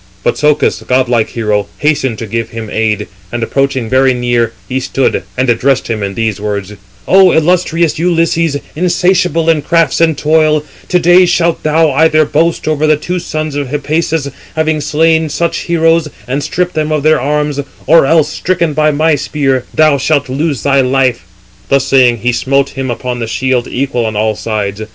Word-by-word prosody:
But - - +1
Socus, 150 0 +1
godlike 125 -3 +1
hero, 105 -3 -1
hastened 145 -6 0
to 115 - -5
give 115 +1 -3
him 115 -2 -7
aid; 110 -2 -1 0.3
and 120 -1 -3
approaching 135 0 -1
very 130 +2 +2
near, 120 -2 0 0.2
he 130 0 -2
stood, 135 +1 -1 0.2
and 130 +1 +1
addressed 125 +3 +1
him 110 -2 -2
in 100 -1 -4
these 110 -3 -2
words: 105 -1 -4 0.3
"O 190 -1 +5
illustrious 170 -1 +1
Ulysses, 165 -3 +1 0.2
insatiable 175 -1 +1
in 160 -2 +3
crafts 165 0 +1
and 160 -2 +2
toil, 155 0 +2 0.2
to 180 - +2
day 175 +1 +5
shalt 170 -1 +1
thou 155 0 +2
either 155 +2 +3
boast 160 +3 0
over 155 0 +1
the 155 -1 +3
two 180 +4 -3
sons 155 -3 -4
of 145 -2 -2
Hippasus, 150 +1 -2 0.2
having 160 -1 0
slain 160 +2 +1
such 170 +3 -2
heroes, 165 -1 +2 0.2
and 135 +3 -2
stripped 180 +5 -2
them 155 0 -2
of 150 -2 -1
their 155 -2 +3
arms, 150 +1 -1 0.3
or 165 -3 +5
else 160 -1 +3
stricken 170 -2 -1
by 155 +1 +2
my 155 +2 +1
spear, 135 -3 -1
thou 155 -3 +3
shalt 145 +1 0
lose 140 +1 -2
thy 140 -1 +3
life." 130 -6 0 0.4
Thus 135 -1 +2
saying, 130 -3 +3
he 125 - +1
smote 135 +3 0
him 135 -1 -5
upon 125 +1 -4
the 115 - -3
shield 130 +1 -1
equal 125 -3 -2
on 110 - -4
all 110 +1 0
sides. 105 -2 -3
145 Hz, 180 wpm, -12 LUFS, 125-160 Hz, 0.4 s, O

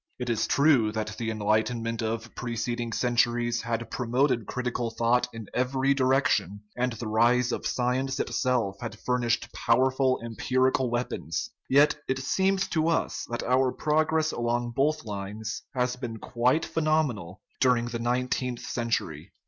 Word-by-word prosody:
It 125 -1 -2
is 115 -1 0
true 140 -7 +4
that 110 -1 -3
the 115 -1 -2
enlightenment 110 +2 0
of 115 +1 -3
preceding 120 -1 -3
centuries 120 0 +1
had 115 0 -3
promoted 125 -1 +1
critical 125 -1 -2
thought 120 +2 +1
in 115 -1 -8
every 130 +2 +1
direc 135 0 +2
tion, 100 +4 0
and 125 0 0
the 115 0 -6
rise 120 +3 +3
of - - -2
science 130 +2 -1
itself 120 -7 0
had 120 - -5
furnished 120 -2 -1
pow 115 - +2
erful 130 0 +2
empirical 130 +2 +1
weapons; 120 - -3 0.2
yet 145 +3 +5
it 130 - 0
seems 190 +8 +1
to 160 0 +1
us 165 - -1
that 120 - -3
our 130 +1 +2
progress 155 +2 +1
along 120 0 -1
both 155 +2 +1
lines 105 +1 -5
has 125 0 0
been 120 -3 -5
quite 125 +7 +1
phenomenal 140 - 0 0.2
during 125 -2 +3
the 120 -1 -4
nineteenth 125 +1 -1
century. 100 -8 -3
120 Hz, 150 wpm, -27 LUFS, 115-130 Hz, 0.2 s, yet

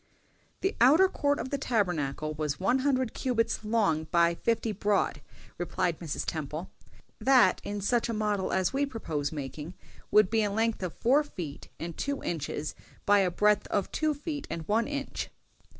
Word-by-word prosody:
"The 385 - 0
outer 310 +10 +7
court 285 -6 0
of - - -4
the 280 - -1
Tabernacle 160 - -1
was 150 -2 -2
one 245 +8 +2
hundred 260 -3 +1
cubits 230 -3 0
long 205 -8 +1
by 170 +1 +3
fifty 225 +5 0
broad," 200 -6 0 0.4
replied 175 -1 -1
Mrs. 165 -4 -3
Temple; 155 +3 -4 0.5
"that, 265 -2 +5
in 205 0 -4
such 235 +4 +1
a - - 0
model 210 -3 0
as 190 +2 +1
we 275 +1 +1
propose 155 - -3
making, 150 +3 -6 0.3
would 210 -2 +5
be 225 -1 +3
a 210 - +1
length 225 +2 0
of 180 -3 -4
four 270 +6 +3
feet 175 - -7
and 165 0 -5
two 280 0 -3
inches, 150 -2 -3 0.3
by 205 0 +5
a 190 -2 +3
breadth 210 +3 +2
of 200 - -1
two 310 -1 0
feet 290 0 -5
and 165 -1 -5
one 220 +3 +2
inch." 285 -1 -4
205 Hz, 170 wpm, -29 LUFS, 170-250 Hz, 0.5 s, outer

